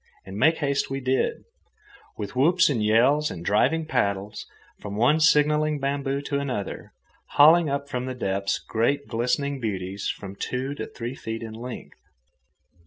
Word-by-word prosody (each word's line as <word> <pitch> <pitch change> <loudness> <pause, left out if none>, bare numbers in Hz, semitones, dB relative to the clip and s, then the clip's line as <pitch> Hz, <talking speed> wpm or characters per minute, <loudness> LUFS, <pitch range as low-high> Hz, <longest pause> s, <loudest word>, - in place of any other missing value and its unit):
And 95 0 -9
make 160 +9 +3
haste 140 -2 -1
we 135 0 -3
did, 130 - 0 0.7
with 105 +1 -6
whoops 170 +7 +4
and 115 -6 0
yells 130 +8 +3
and 85 0 -8
driving 160 +10 +2
paddles, 100 -7 -2 0.3
from 100 -1 -6
one 125 +9 +3
signalling 150 0 +3
bamboo 140 0 -2
to 140 0 -1
another, 125 -8 -4 0.4
hauling 160 +2 +6
up 140 0 -2
from 125 -2 -4
the 130 - -4
depths 100 -4 -1
great 140 +6 -1
glistening 125 +4 -1
beauties 95 -3 -3
from 100 -1 -6
two 130 +6 -3
to - - -6
three 120 +1 -6
feet 115 -3 -6
in 110 -1 -7
length. 120 +2 -9
130 Hz, 155 wpm, -25 LUFS, 110-145 Hz, 0.7 s, hauling